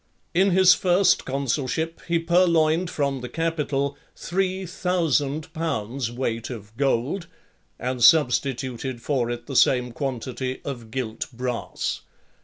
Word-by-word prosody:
In 190 +3 +4
his 185 0 +7
first 180 +1 +3
consulship 140 +4 -2
he 170 -1 +2
purloined 170 0 +3
from 140 -5 -1
the 125 - -6
Capitol 150 -4 -1 0.2
three 190 +1 -1
thousand 165 -5 0
pounds' 125 -6 -2
weight 115 -2 -3
of 110 -3 -9
gold, 140 +7 0 0.5
and 125 0 -2
substituted 130 -3 +3
for 125 -2 -1
it 120 0 -4
the 135 - -6
same 125 -1 +4
quantity 130 0 -4
of 120 -5 -6
gilt 115 -2 -4
brass. 125 -1 -3
140 Hz, 120 wpm, -24 LUFS, 125-165 Hz, 0.5 s, his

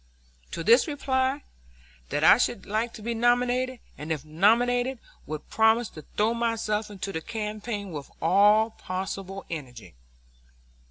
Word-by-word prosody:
To 165 - -5
this 235 - +5
I 300 - -3
replied 265 0 0 0.7
that - - -1
I - - +7
should - - -1
like 220 +3 -1
to 215 - -10
be 235 +1 -2
nominated, 245 +2 +1 0.2
and 150 +2 -5
if 155 -2 -3
nominated 245 +10 +2 0.3
would 155 0 -6
promise 220 +1 +3
to 155 - -11 0.2
throw 215 +2 +3
myself 225 -2 -1
into 200 -1 -5
the 160 -3 -4
campaign 210 0 -5
with 145 -3 -7
all 205 +6 +4
possible 195 0 -5
energy. 130 -8 -8
215 Hz, 145 wpm, -26 LUFS, 190-240 Hz, 0.7 s, I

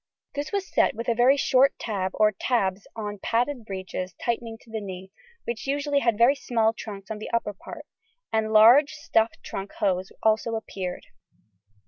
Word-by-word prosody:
This 290 +2 -4
was 395 -2 -2
set - - +2
with 230 +2 -5
a - - +4
very 250 +4 +4
short 270 0 +3
tab 190 -4 -3
or 215 -1 +4
tabs 195 -3 -1
on 210 -2 -5
padded 245 +1 0
breeches 185 -2 -5
tightening 230 -1 -3
to 225 - -18
the 220 -1 -3
knee, 190 -1 -8 0.3
which 235 +2 -5
usually 285 +1 +1
had 235 -5 +1
very 235 +4 +6
small 225 -5 +1
trunks 205 -2 -8
on 215 - -4
the - - -6
upper 230 -3 -1
part, 190 - -10 0.5
and 220 0 +1
large, 235 +7 +7
stuffed 225 +1 0
trunk 195 +1 -6
hose 185 -2 -1
also 220 +1 +2
appeared. 190 -5 -5
220 Hz, 170 wpm, -25 LUFS, 200-245 Hz, 0.5 s, large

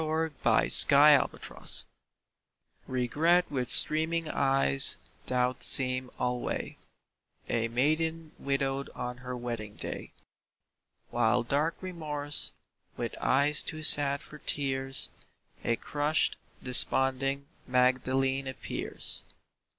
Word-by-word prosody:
REGRET 160 0 -2
AND 145 0 +5
REMORSE - - -3 1.0
Regret 150 +8 +1
with 130 -3 -2
streaming 160 +1 +3
eyes 135 - +3 0.3
doth 125 0 -1
seem 130 -1 +4
alway 125 0 -4 0.7
A 115 -1 -1
maiden 155 +6 -2
widowed 135 0 -3
on 125 0 -6
her 125 0 -7
wedding 115 -4 -7
day. - - -8 1.0
While 120 +2 +1
dark 145 +7 -1
Remorse, 150 -5 -5 0.5
with - - -5
eyes 140 +3 +3
too 155 -1 -6
sad 140 -2 +5
for 150 - -13
tears, 135 -2 -2 0.5
A 115 - 0
crushed, 145 +6 -1 0.3
desponding 135 +2 +2 0.2
Magdalene 130 +1 0
appears. 130 - -4
135 Hz, 95 wpm, -28 LUFS, 125-150 Hz, 1.0 s, AND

